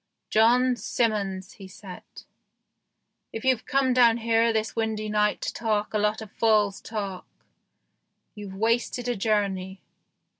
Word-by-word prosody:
" - - -56
John 245 +3 +4
Simmons," 200 -6 -2
he 195 - -12
said, 185 -1 -11 0.7
" - - -54 0.3
if 225 - -6
you've 260 -4 +1
come 270 -1 +2
down 235 -2 +5
here 230 0 +2
this 220 0 -2
windy 220 -1 -2
night 210 0 +1
to - - -3
talk 215 -3 -1
a 215 - +1
lot 210 +1 0
of 210 - -13
fool's 210 -3 +2
talk, 200 -4 -5 1.1
you've 205 -3 -9
wasted 230 +3 0
a 245 - 0
journey." 195 -3 -1
220 Hz, 145 wpm, -26 LUFS, 205-230 Hz, 1.1 s, down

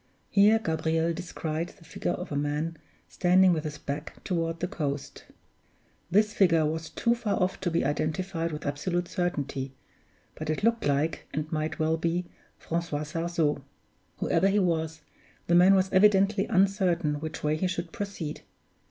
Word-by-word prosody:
Here 210 +2 +6
Gabriel 160 -3 0
descried 165 -1 -4
the 165 - -18
figure - - -2
of - - -6
a - - -2
man 150 +3 -1 0.3
standing 185 0 +4
with 155 -2 -2
his 150 -1 -4
back 145 +1 -5
toward 165 -2 -1
the 180 - -1
coast. 145 -8 -4 0.8
This 210 +4 +3
figure 165 -6 +4
was 160 +1 -2
too 235 - +1
far 230 -4 -1
off 185 0 0
to 185 - 0
be 165 -3 0
identified 165 +4 -1
with 150 0 -6
absolute 175 +5 -1
certainty, 140 -7 -2 0.6
but 155 0 -6
it 155 +6 -1
looked 230 -5 +2
like, 145 +3 0
and 155 +1 -3
might 155 0 -2
well 160 +1 +1
be, 170 +2 -1 0.3
Francois 165 -3 -2
Sarzeau. 165 -1 -1 0.6
Whoever 170 +4 +2
he 200 +1 +2
was, 160 -4 0 0.4
the 170 - +1
man 180 +3 +7
was 190 0 +1
evidently 195 +1 +4
uncertain 185 -6 +2
which 155 +1 -6
way 150 0 +2
he 185 +4 0
should 170 -2 -4
proceed. 190 -7 -5
165 Hz, 160 wpm, -28 LUFS, 155-185 Hz, 0.8 s, man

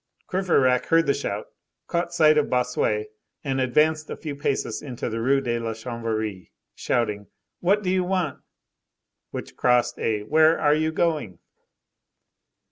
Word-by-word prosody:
Courfeyrac 150 -10 +2
heard 165 0 +4
the 140 - +3
shout, - - -3 0.4
caught 170 0 -2
sight 155 -3 +5
of 150 -1 +2
Bossuet, 120 -4 0 0.3
and 135 -2 -1
advanced 155 +5 +2
a - - -5
few 150 -3 -6
paces 140 -1 -2
into 125 -4 -5
the 115 0 -3
Rue 135 +3 +3
de 120 -3 -1
la 115 -1 -3
Chanvrerie, 110 -4 -4 0.2
shouting: 105 -4 -1 0.3
"What 200 +4 +2
do 180 - 0
you 185 -1 +2
want?" 180 -6 -1 0.9
which - - -7
crossed 125 -1 +2
a 105 -2 -1
"Where 155 +7 +4
are 145 - +4
you 155 +1 +1
going?" 155 - -1
135 Hz, 145 wpm, -24 LUFS, 115-160 Hz, 0.9 s, sight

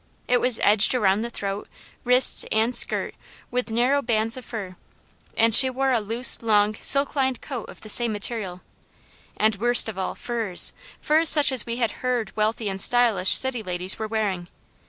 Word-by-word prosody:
It 245 0 0
was 250 -2 +1
edged 210 +4 +2
around 205 -3 0
the 235 - -5
throat, 200 -3 -7 0.4
wrists, 250 +1 +3
and 225 +3 -1
skirt - - -1 0.4
with 250 0 -4
narrow 250 +5 0
bands 225 -2 0
of 255 - -9
fur, 200 -7 -9 0.6
and 225 0 +1
she 260 +3 +7
wore 265 +1 -2
a 245 - 0
loose, 230 +4 +4
long, 210 -2 0
silk 275 +1 +3
lined 265 -3 -2
coat 255 -6 -9
of - - -15
the - - -12
same 235 +2 +3
material, 205 -4 -5 0.8
and 215 -1 0
worst 240 +3 +4
of 210 -3 -7
all, 190 - -5
furs 225 -7 +1 0.3
furs 315 +1 +3
such 290 -3 +5
as 260 -2 +1
we 235 - -4
had 235 -3 -2
heard 245 -5 -4
wealthy 215 +1 -3
and 195 -1 -3
stylish 225 -7 +3
city 260 -3 -1
ladies 180 -1 -3
were 220 - -5
wearing. 205 -5 -4
230 Hz, 180 wpm, -22 LUFS, 210-250 Hz, 0.8 s, she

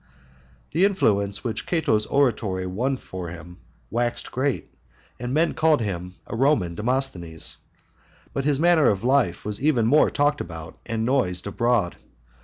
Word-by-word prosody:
IV. 65 -1 -30
The 175 +5 +3
influence 100 - +1
which 115 -3 -3
Cato's 150 -11 +1
oratory 110 -9 +1
won 125 +9 -1
for 95 -7 -7
him 85 +1 -10 0.3
waxed 120 +1 -2
great, 135 +1 -2 0.5
and 125 0 -4
men 160 +5 +2
called 155 -1 +3
him 90 -4 -4
a - - -6
Roman 115 - +2
Demosthenes; 105 - -2 0.8
but 135 - -1
his 145 -1 +1
manner 170 -2 +5
of 100 0 -1
life 125 -9 +2
was 105 +4 -3
even 135 -7 +3
more 145 +7 +5
talked 145 0 +1
about 80 -2 -8
and 115 -1 -1
noised 115 -9 0
abroad. 110 -2 0
115 Hz, 150 wpm, -24 LUFS, 90-140 Hz, 0.8 s, manner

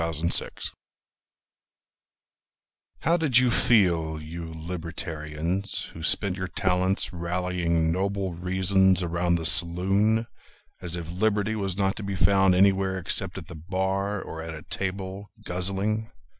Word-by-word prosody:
Jacob 80 0 -1
Godbey - - -2 2.3
How 170 +1 +3
did 150 -8 +3
you 125 -1 +5
feel, 85 -10 +3
you 80 +2 -7
libertarians, 85 +1 -4
Who 80 - -9
spent 95 +3 +1
your 95 -1 -3
talents 90 0 0
rallying 85 -1 0
noble 95 +1 -1
reasons 95 +1 +2
Around 85 0 +1
the 80 -1 -2
saloon, 95 +7 +2 0.6
as 90 -2 -3
if 85 -1 -5
Liberty 105 +3 +1
Was 95 -3 -2
not 95 0 +1
to 105 - -5
be 100 -1 -3
found 95 -1 +4
anywhere 95 0 +3
except 95 +1 -2
at 90 - -6
the 85 - -10
bar 95 +4 -1
Or 80 -3 -6
at 80 0 -6
a 75 - -9
table, 95 +2 -4 0.2
guzzling? 100 +5 -1
90 Hz, 130 wpm, -26 LUFS, 85-100 Hz, 2.3 s, you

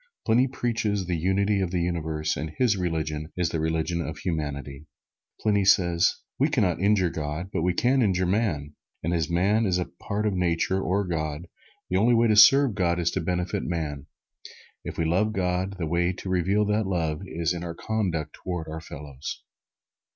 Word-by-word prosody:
Pliny 120 +4 +4
preaches 115 -6 -1
the 90 0 -1
Unity 100 +4 +1
of 95 - 0
the 90 0 -1
Universe 80 -3 -1
and 80 - -4
his 120 -5 +3
religion 80 -4 -2
is 90 -2 +1
the 80 - -2
religion 80 +2 -1
of 75 -2 -5
Humanity. 75 -3 -4 0.5
Pliny 105 -2 +2
says: 85 -2 +4 0.2
"We - - +3
can - - +2
not - - 0
injure 100 -3 +3
God, 75 +5 -4
but 90 - 0
we 90 +2 +1
can 130 +5 +3
injure 95 -4 +2
man. 90 -7 0 0.3
And 85 - 0
as 80 -4 0
man 100 +6 +2
is 90 -1 +1 0.2
part 105 +1 -2
of 105 - +1
Nature 90 +1 +1
or 95 +2 +1
God, 80 -2 -3 0.4
the 90 - 0
only 120 +5 +4
way 115 +1 +4
to 110 - +3
serve 135 +3 +7
God 85 -2 +1
is 85 -1 +1
to - - -2
benefit 90 +1 -1
man. 75 -4 -4 0.8
If - - -6
we 80 - 0
love 95 +7 +1
God, 95 0 -1
the 85 - -2
way 85 +3 +1
to 95 +1 -7
reveal 95 +4 +2
that 105 0 0
love 80 -4 -1
is 85 -2 -2
in 85 -1 -5
our 85 -1 -5
conduct 90 -7 -2
toward 90 -3 -4
our 80 +1 -6
fellows." 75 -3 -8
90 Hz, 190 wpm, -26 LUFS, 80-100 Hz, 0.8 s, serve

